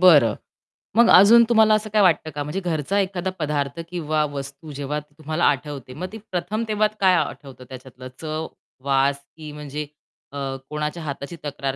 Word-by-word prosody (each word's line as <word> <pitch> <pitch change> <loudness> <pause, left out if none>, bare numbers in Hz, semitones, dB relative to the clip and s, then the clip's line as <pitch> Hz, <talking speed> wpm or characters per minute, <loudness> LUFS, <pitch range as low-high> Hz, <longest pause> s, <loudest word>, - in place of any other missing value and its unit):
बरं. 145 -12 +7 0.6
मग 235 - +6
अजून 220 +5 +8
तुम्हाला 220 -2 +5
असं 215 0 0
काय 215 0 +3
वाटतं 175 -4 +3
का? 145 - -4
म्हणजे 150 +7 -3
घरचा 175 +1 -1
एखादा 190 -1 -1
पदार्थ 145 -1 -2
किंवा 155 -3 0
वस्तू 140 +2 -7
जेव्हा 145 +1 -3
तुम्हाला 155 +2 -5
आठवते. 140 -2 -1
मग 175 +7 -5
ती 220 - -7
प्रथम 185 +5 -2
तेव्हा 215 0 +2
काय 190 -2 +5
आठवतं 135 -6 -4
त्याच्यातलं 130 0 -10
चव, 155 0 -3 0.4
वास 140 0 +2 0.2
की 155 -1 -8
म्हणजे 150 0 -6 0.5
अ, - - -4 0.3
कोणाच्या 150 +2 -3
हाताची 140 +2 -6
तक्रार 140 -2 -3
150 Hz, 165 wpm, -23 LUFS, 140-185 Hz, 0.6 s, अजून